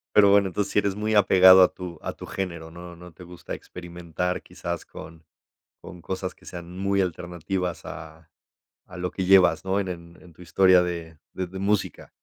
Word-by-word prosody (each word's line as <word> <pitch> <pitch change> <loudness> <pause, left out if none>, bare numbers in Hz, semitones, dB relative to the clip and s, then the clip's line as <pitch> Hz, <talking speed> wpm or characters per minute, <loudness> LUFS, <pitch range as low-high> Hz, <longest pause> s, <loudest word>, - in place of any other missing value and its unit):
Pero 100 -1 +7
bueno, 100 -1 +5
entonces 100 +2 -3
sí - - -2
eres 100 -1 +2
muy 110 +1 -1
apegado 95 -2 +7
a 90 - +2
tu 90 -3 -8
a - - -4
tu - - -11
género, 85 -4 -5
no 85 +1 -11
no 90 0 -13
te 90 - -13
gusta 90 -1 -8
experimentar 90 0 -5
quizás 85 -1 -6
con 80 0 -12 0.6
con 90 -2 -12
cosas 95 0 -4
que - - -22
sean 85 0 -9
muy 100 0 +1
alternativas 90 0 -4
a 80 +1 -10 0.6
a 90 - -14
lo 90 0 -4
que 95 - -3
llevas, 95 0 +5
¿no?, 95 +1 0
en 95 - -5
en 85 -1 -9
en 90 - -16
tu 85 - -18
historia 90 +1 +4
de 85 -2 -5 0.2
de 95 -1 -4
de 95 +1 -8
música. 100 0 -1
90 Hz, 195 wpm, -25 LUFS, 85-95 Hz, 0.6 s, Pero